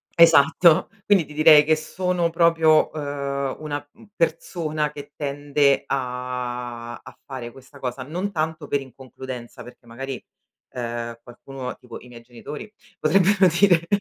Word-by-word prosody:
Esatto, 165 0 +5 0.2
quindi 195 -5 +4
ti 150 - -13
direi 155 0 +7
che 155 +1 +3
sono 175 +2 -1
proprio, 165 -2 +4
ehm, 140 -2 -3
una, 145 -2 -4
uhm, 220 - -19
persona 155 -2 -1
che 145 -1 -10
tende 145 -1 +1
a 125 -2 -4
a 130 0 -14
fare 130 -3 -7
questa 135 +3 -16
cosa, 130 0 -4
non 180 +8 -4
tanto 155 -3 -3
per 145 - 0
inconcludenza, 130 -1 -9
perché 120 -1 -15
magari, 130 +3 -7 0.5
ehm, 120 -1 -4
qualcuno 125 +1 -8
tipo 120 -2 -11
i - - -15
miei 120 -1 -12
genitori 140 - -9 0.3
potrebbero 190 +4 +4
dire 175 -4 +4
145 Hz, 135 wpm, -23 LUFS, 125-160 Hz, 0.5 s, direi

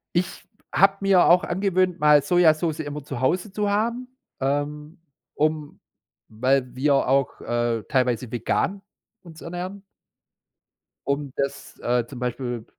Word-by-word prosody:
Ich 175 +1 -1 0.3
habe 195 +1 +4
mir 195 -2 +5
auch 175 +1 +5
angewöhnt, 185 -1 0
mal 150 -1 +6
Sojasoße 160 -1 +2
immer 145 0 -6
zu 135 -3 -6
Hause 180 +10 0
zu 205 +1 -1
haben, 235 +5 -1 0.3
ähm, 150 +4 -3 0.3
um 155 -1 -1 0.5
weil 130 +3 0
wir 140 +2 +2
auch, 135 +1 +1
äh, 120 -2 -1
teilweise 125 -2 0
vegan 190 - -1 0.4
uns 165 -2 -13
ernähren 180 +3 -6 1.2
um 140 0 -1
das, 140 0 -4
äh, 120 -1 0
zum 125 +1 -10
Beispiel 120 -2 -3
150 Hz, 125 wpm, -24 LUFS, 130-180 Hz, 1.2 s, mal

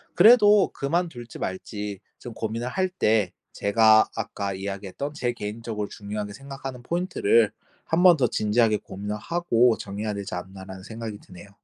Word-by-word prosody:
그래도 210 -4 +7
그만둘지 140 -5 -3
말지 100 +1 -5 0.2
좀 120 - -9
고민을 115 +2 -3
할 185 +6 0
때 110 - +1 0.2
제가 110 +1 +4
아까 105 -3 -3
이야기했던 100 +8 -5
제 120 -4 -1
개인적으로 105 -1 -5
중요하게 105 0 -5
생각하는 135 -1 -8
포인트를 400 - +2 0.3
한번 175 +1 +5
더 130 -5 +2
진지하게 110 0 +2
고민을 105 +2 -6
하고 125 -5 +2
정해야 105 +2 -4
되지 100 -2 -6
않나라는 95 +1 -8
생각이 110 -1 -7
드네요. 90 +2 -14
110 Hz, 355 characters per minute, -25 LUFS, 100-140 Hz, 0.3 s, 그래도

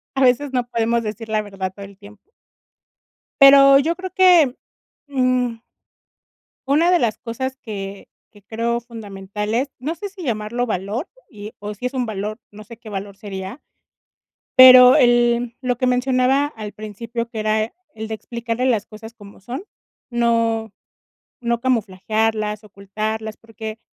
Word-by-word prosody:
A 270 - 0
veces 260 +2 +3
no 250 -2 -1
podemos 230 0 0
decir 220 +1 -6
la 215 0 +1
verdad 195 -2 -5
todo 200 - -9
el 200 0 -14
tiempo. 210 - -17 1.1
Pero 275 0 +9
yo 330 +4 -1
creo 375 0 -7
que, 350 -9 +5 0.5
mm 255 -4 0 1.1
una 310 +6 +3
de 355 - +5
las 230 -8 0
cosas 260 +3 -5
que 200 -5 -8 0.2
que 205 - -19
creo 230 +3 -2
fundamentales, 210 +1 -4
no 290 +6 -3
sé 405 +5 -6
si 390 -1 -12
llamarlo 235 -2 -2
valor 215 - -3 0.2
y 210 0 -10
o 210 +1 -6
si 205 - -12
es 250 - -1
un 255 -2 -2
valor, 215 0 -4
no 215 +1 -12
sé 230 +2 -13
qué 235 - -13
valor 200 -1 -6
sería, 195 +4 -8 1.0
pero 255 0 +10
el 240 -2 +3
lo 250 -1 -1
que 255 - -1
mencionaba 255 +2 +2
al 215 -7 -8
principio, 230 +3 -6
que 225 -2 -6
era 215 +1 0 0.2
el 220 0 -6
de 220 - -3
explicarle 235 +2 -4
las 230 -5 +1
cosas 220 +1 -11
como 205 -3 -15
son, 245 - -7 0.5
no 230 -2 0 0.7
no 235 -1 0
camuflajearlas, 215 -2 -1
ocultarlas, 215 +2 -5
porque 220 -1 -9
230 Hz, 150 wpm, -20 LUFS, 210-255 Hz, 1.1 s, pero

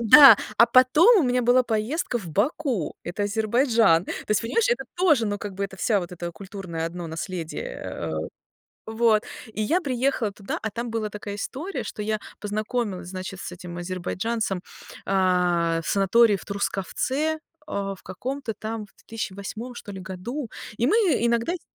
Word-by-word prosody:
Да, 275 +5 +10 0.2
а 235 - +8
потом 305 - +6
у - - +2
меня 250 -2 +2
была 245 +2 +5
поездка 240 +4 -1
в 185 -7 -8
Баку, 235 - 0
это 175 +4 -3
Азербайджан. 220 - +3
То - - -3 0.2
есть, 210 - +3
понимаешь, 455 - +1
это 485 - +1
тоже, 310 -11 +4
ну, 205 0 -2
как 205 -1 -6
бы, 195 - -4
это 195 -1 -7
вся 205 +1 +2
вот 175 -1 -6
это 175 -1 -5
культурное 180 -2 -5
одно 175 0 -6
наследие, 165 +1 -5
э. 80 -1 -4 0.8
Вот, 220 -1 +3 0.3
и 215 - -2
я 325 - +2
приехала 255 - 0
туда, 200 -1 -5
а 220 - -3
там 235 +3 -4
была 225 -1 -1
такая 205 0 -6
история, 305 - -4
что 210 - -5
я 215 +1 0 0.2
познакомилась, 210 -2 -2
значит, 185 0 -6
с - - -6
этим 175 0 -8
азербайджанцем, 185 +3 -2 0.5
а, 180 -3 +2
в - - -5
санатории 205 +3 +4
в - - -11
Трускавце, 260 +10 -1 0.3
а, 200 -7 -3
в 190 - -18
каком-то 250 +5 -4
там 220 +1 -5
в - - -29
2008 220 +3 -6
что 205 - -8
ли 190 - -7
году, 215 +8 -5 0.3
и 235 - +2
мы 425 - +4 0.2
иногда 235 +5 +1
сь 360 - -6
215 Hz, 170 wpm, -25 LUFS, 190-245 Hz, 0.8 s, Да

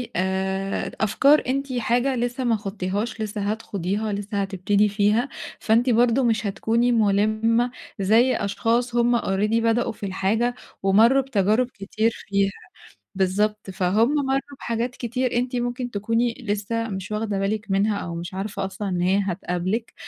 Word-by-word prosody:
آآ 190 +1 -1
د - - -9
أفكار 275 +8 +4
أنتِ 275 +1 -1
حاجة 245 +2 +1
لسه 245 +1 -2
ما 235 -2 +2
خُضتيهاش 205 +2 -3
لسه 210 -1 -3
هتخُوضيها 205 0 -2
لسه 200 0 -2
هتبتدي 200 +2 +1
فيها، 210 +5 +2 0.3
فأنتِ 230 +3 +2
برضه 240 +2 +3
مش 225 -2 +1
هتكوني 230 +4 +1
مُلِمة 220 +2 +2 0.3
زي 225 +6 +4
أشخاص 230 +4 0
هُم 240 0 +3
already 205 +2 0
بدأوا 230 +1 +2
في 210 - -7
الحاجة 215 +6 0 0.3
ومرّوا 225 +8 +5
بتجارب 225 -1 +1
كتير 215 +3 -1 0.2
فيها. 200 0 +1 0.6
بالضبط، 205 +2 0
فهُم 200 +9 +2
مرّوا 270 0 +2 0.2
بحاجات 235 +2 -2
كتير 250 +1 -2
أنتِ 250 +1 -1
ممكن 245 0 -2
تكوني 230 +3 0
لسه 210 +3 -1
مش 190 0 -5
واخدة 210 -2 -1
بالِك 205 +1 -2
منها 200 +2 +2
أو 170 -3 -5
مش 170 +3 -6
عارفة 195 0 -3
أصلًا 200 +1 -4
إن 180 -1 -1
هي 190 +3 +3
هتقابلِك، 185 +4 -2
215 Hz, 145 wpm, -23 LUFS, 195-240 Hz, 0.6 s, ومرّوا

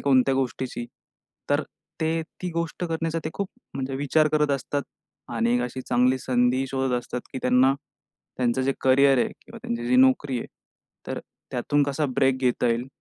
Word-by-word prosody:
कोणत्या 135 -1 +4
गोष्टीची, 130 -2 -2 0.7
तर - - +3 0.4
ते 160 +1 +1 0.2
ती 180 - -2
गोष्ट 170 +1 -3
करण्याचा 165 -1 -1
ते 155 - -2
खूप 200 -1 -2 0.3
म्हणजे 135 0 -3
विचार 150 +3 +3
करत 150 -1 +3
असतात 140 +1 -1 0.5
आणि 120 +1 +2
अशी 125 +1 -4
चांगली 125 +1 +3
संधी 130 0 +1
शोधत 130 0 -1
असतात, 120 +1 -5
की 130 - -3
त्यांना 125 +2 +4 0.6
त्यांचं 125 +1 +1
जे 135 +1 +2
करियर 135 +1 +5
आहे - - +2
किंवा - - -12
त्यांची 120 0 -3
जी 125 +1 +3
नोकरी 130 0 +4
आहे - - -5 0.6
तर - - -3 0.3
त्यातून 145 +4 +1
कसा 140 +1 0
ब्रेक 135 0 +3
घेता 125 -1 +1
येईल. 120 +2 0
130 Hz, 165 wpm, -25 LUFS, 125-145 Hz, 0.7 s, करियर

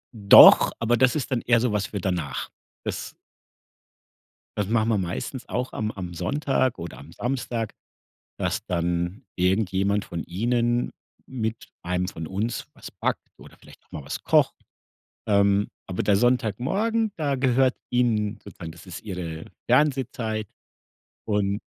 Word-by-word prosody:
Doch, 100 -2 +9
aber 115 +1 +2
das 125 +3 +3
ist 145 -2 -3
dann 125 -3 +1
eher 120 -1 +3
so 120 0 +1
was 105 -2 0
für 100 - -5
danach. 85 -7 -2 0.3
Das - - -5 1.4
Das 105 -2 0
machen 115 0 +2
wir 110 - +2
meistens 95 +8 -4
auch 125 +1 -2
am 110 0 -2
am 90 -4 -7
Sonntag 135 - 0
oder 85 0 -7
am 75 +4 -13
Samstag, 120 -1 -3 0.7
dass - - -1
dann 85 +6 -2
irgendjemand 95 +2 +1
von 85 -2 -5
ihnen 120 +7 0 0.3
mit 115 -3 -4
einem 90 +1 -1
von 80 -3 -6
uns 105 +7 -3
was - - -10
backt - - -2
oder - - -15
vielleicht - - -17
auch - - -37
mal 75 - -7
was - - -5
kocht, - - +3 0.7
ähm, 100 0 +3 0.2
aber 90 - -2
der 100 - +3
Sonntagmorgen, 130 - +1
da 145 -3 0
gehört 130 0 +2
ihnen 110 -4 +1
sozusagen 85 -3 -9
das 85 +2 -14
ist 90 -3 -8
ihre 85 -6 -6 0.2
Fernsehzeit, 125 -7 +1 0.8
und 105 -1 0
110 Hz, 145 wpm, -25 LUFS, 90-125 Hz, 1.4 s, Doch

